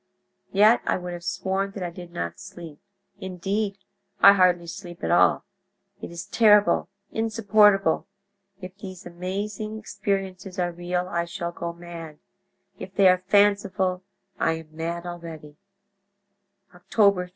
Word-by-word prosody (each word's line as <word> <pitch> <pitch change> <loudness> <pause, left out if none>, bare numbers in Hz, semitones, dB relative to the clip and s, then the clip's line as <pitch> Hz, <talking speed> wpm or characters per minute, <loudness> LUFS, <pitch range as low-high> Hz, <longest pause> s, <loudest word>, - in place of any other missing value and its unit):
Yet 210 +4 +5
I - - +2
would 180 -1 -6
have 175 0 -8
sworn 195 +2 -2
that 195 - -5
I 175 - -3
did 175 0 -10
not 170 - -5
sleep—indeed, 195 +2 -6 0.4
I 200 - +9
hardly 180 -3 +3
sleep 175 0 -9
at - - 0
all. - - +4 0.6
It - - -6
is 170 0 -7
terrible, 210 -6 +4 0.2
insupportable! 210 -5 +3 0.5
If 185 -1 -9
these 185 -2 -9
amazing 200 +5 -4
experiences 195 -3 -4
are 175 -1 0
real 175 +1 -2
I 170 -1 -1
shall 170 0 -5
go 170 0 -5
mad; 170 -2 -9 0.6
if 190 - -9
they 195 -2 +6
are 185 0 +4
fanciful 200 -1 +2 0.4
I 165 - +2
am 160 -1 -9
mad 170 +2 -4
already. 165 -4 -8 1.2
"Oct. 175 0 -20 0.2
3. 180 -1 -5
185 Hz, 135 wpm, -25 LUFS, 170-200 Hz, 1.2 s, I